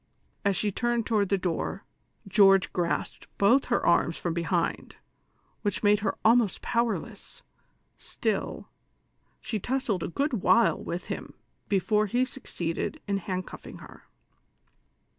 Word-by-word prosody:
As 200 -1 +2
she 205 +2 0
turned 240 +2 0
toward 205 -4 +1
the 195 - +3
door, 185 +1 -3 0.4
George 195 -1 +5
grasped 175 -2 -2
both 235 +7 +4
her 240 - 0
arms 170 -1 +3
from 170 - -2
behind, 170 0 -1 0.7
which 205 -1 -2
made 205 0 +5
her 210 - -2
almost 225 -3 +3
powerless; 235 -1 -2 0.6
still, - - -3 0.7
she 215 - -3
tussled 245 -4 -1
a - - -2
good 270 - -1
while 235 +3 +4
with 175 +1 -4
him - - -6 0.3
before 210 +2 +2
he 245 +6 +1
succeeded 245 - -4
iu 200 -1 +1
hand 185 -1 -3
cutHng - - -10
her. - - -14
205 Hz, 130 wpm, -27 LUFS, 185-235 Hz, 0.7 s, George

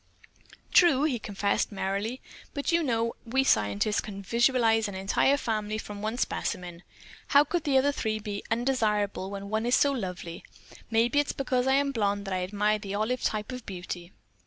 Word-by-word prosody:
"True!" 310 -6 +6
he 275 -6 +1
confessed, 200 -1 -1
merrily, 200 +5 -2 0.3
"but 285 +3 -1
you 335 0 +3
know 230 -5 0
we 265 +4 +1
scientists 105 - +2
can 200 -2 -8
visualize 230 0 +3
an 200 - -6
entire 195 +8 +2
family 215 -4 -2
from 205 -2 -7
one 220 +3 -2
specimen. 180 -8 -3 0.5
How 285 +1 +6
could 340 +1 -2
the 275 -2 +3
other 280 +2 +3
three 220 -6 -2
be 205 -1 -5
undesirable 215 -5 0
when 200 0 -6
one 220 +2 0
is 245 - +4
so 285 - +4
lovely? 180 -8 -5 0.5
Maybe 235 +4 +3
it's 290 - 0
because 255 -1 0
I 265 - +4
am 280 0 +2
a - - -4
blonde 205 -3 0
that 195 - -3
I 185 - 0
admire 210 +3 +1
the 200 -1 -5
olive 225 +4 -1
type 215 +3 -1
of 250 -1 -6
beauty." 180 -1 -6
220 Hz, 185 wpm, -28 LUFS, 200-255 Hz, 0.5 s, True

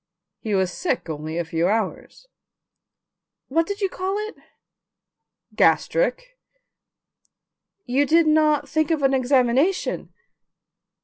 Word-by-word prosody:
He 215 -3 -2
was 190 -1 +1
sick 270 - -2
only 155 +2 -5
a 170 - -1
few 165 +1 0
hours." 215 - -3 1.2
"What 325 +4 +1
did 405 +1 -5
you 390 - +2
call 375 +1 -3
it?" - - -14 1.2
"Gastric." - - +1 1.5
"You 270 +3 +1
did 330 +2 +4
not 305 -2 +3
think 310 -1 0
of 315 -4 0
an 270 0 +3
examination?" 265 +6 +1
285 Hz, 110 wpm, -23 LUFS, 225-335 Hz, 1.5 s, did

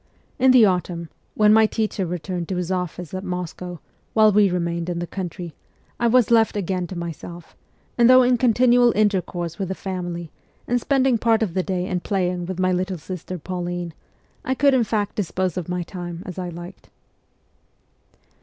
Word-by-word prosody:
In 260 +1 +5
the 255 -3 +7
autumn, 175 -3 -1 0.3
when 210 0 +5
my 220 0 +6
teacher 215 -4 -2
returned 175 0 -4
to 190 - -1
his 180 0 -2
office 180 -2 -4
at 185 0 -4
Moscow, 180 -1 -5 0.4
while 215 -1 +6
we 205 -1 +4
remained 170 -1 -2
in 175 - -2
the 175 - -2
country, 175 -2 -6 0.5
I 235 - +2
was 240 -1 +4
left 225 -2 +4
again 185 -2 -2
to 185 - -7
myself, 170 0 -8 0.4
and 235 0 +6
though 255 0 +8
in 245 -1 +3
continual 245 0 +4
intercourse 185 -5 0
with 195 - -2
the 190 - -3
family, 175 -4 -5 0.4
and 245 0 +1
spending 265 -3 +2
part 225 -1 +3
of 190 -6 -3
the 185 - +1
day 180 -1 -2
in 185 -1 -2
playing 180 -2 -1
with 185 0 -5
my 185 0 +2
little 185 +1 -1
sister 185 +2 -6
Pauline, 175 0 -4 0.5
I 260 - -1
could 280 +1 +4
in 250 -3 +3
fact 210 -2 -2
dispose 185 -3 -1
of 180 -2 -4
my 180 0 -2
time 175 -1 -7
as 185 0 -7
I 180 -1 -4
liked. 175 +2 -10
185 Hz, 180 wpm, -22 LUFS, 175-215 Hz, 0.5 s, though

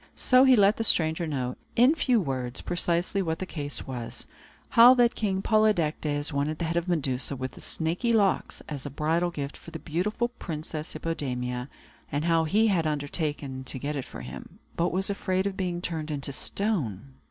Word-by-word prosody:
So 255 +1 +5
he 260 -1 +7
let 205 0 +5
the 225 - 0
stranger 160 -4 +1
know, 130 -4 -2 0.2
in 250 +5 +6
few 255 -7 +2
words, 130 -7 -3
precisely 175 +2 0
what 160 -3 -1
the 185 - -4
case 145 -5 -4
was, 120 -3 -6 0.4
how 240 +2 +8
that 240 -1 +4
King 195 -3 -1
Polydectes 160 -9 +1
wanted 145 +2 0
the 170 - -2
head 165 +1 -2
of 170 +1 0
Medusa 140 -6 -1
with 130 0 -4
the - - -13
snaky 170 +9 -1
locks 205 -4 +1
as 145 -4 -5
a 145 - -4
bridal 160 +5 0
gift 145 -4 -5
for - - -12
the 165 - -6
beautiful 190 +10 -1
Princess 155 -8 -6
Hippodamia, 125 -5 -3 0.4
and 145 +3 -1
how 165 -1 +3
that - - -4
he 215 +6 +4
had 180 -7 +2
undertaken 145 -2 -2
to 130 - -4
get 145 +3 -3
it 135 -3 -3
for - - -9
him, - - -9 0.2
but 170 +1 +1
was 190 +2 -1
afraid 190 -1 -1
of 200 -1 -1
being 180 -2 -2
turned 160 -2 -3
into 140 -2 -3
stone. 140 - -2
165 Hz, 190 wpm, -27 LUFS, 145-195 Hz, 0.4 s, how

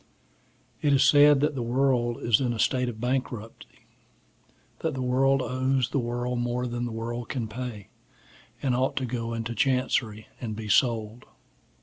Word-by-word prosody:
IT 145 -2 +3
is 135 - +5
said 145 -1 +6
that 150 +1 +1
the 130 - -3
world 120 -1 +1
is 115 +2 +3
in 125 -2 0
a - - -5
state 125 +3 +1
of 110 -2 -8
bankruptcy, 125 -3 -4 0.9
that 160 -3 -2
the 130 - -3
world 135 +1 +2
owes 130 -1 0
the 140 - 0
world 120 0 -2
more 120 +1 -1
than 120 0 -3
the 120 - -4
world 115 +1 -5
can 120 -5 -3
pay, 115 -3 -7 0.7
and 130 -3 +1
ought 130 +1 0
to 130 - -1
go 115 -1 -3
into 115 0 -4
chancery, 115 -3 0
and 110 -3 -4
be 110 0 -6
sold. 110 +1 +1
125 Hz, 165 wpm, -26 LUFS, 115-130 Hz, 0.9 s, said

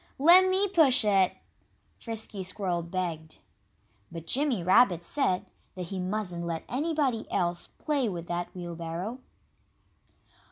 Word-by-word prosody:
"Let 355 +6 +7
me 385 +2 +2
push 300 - +4
it!" 195 -3 +3 0.6
Frisky 220 -3 -5
Squirrel 185 -2 -2
begged. 170 -2 -4 0.7
But 165 -1 -8
Jimmy 255 - +1
Rabbit 185 -2 +4
said 195 -4 0 0.3
that 180 -2 -6
he 195 - -4
mustn't 180 -2 -3
let 165 -1 -3
anybody 280 -4 -1
else 175 -2 -1
play 280 -6 0
with 175 -3 -5
that 175 0 -3
wheelbarrow. 175 +6 -5
190 Hz, 120 wpm, -28 LUFS, 175-255 Hz, 0.7 s, Let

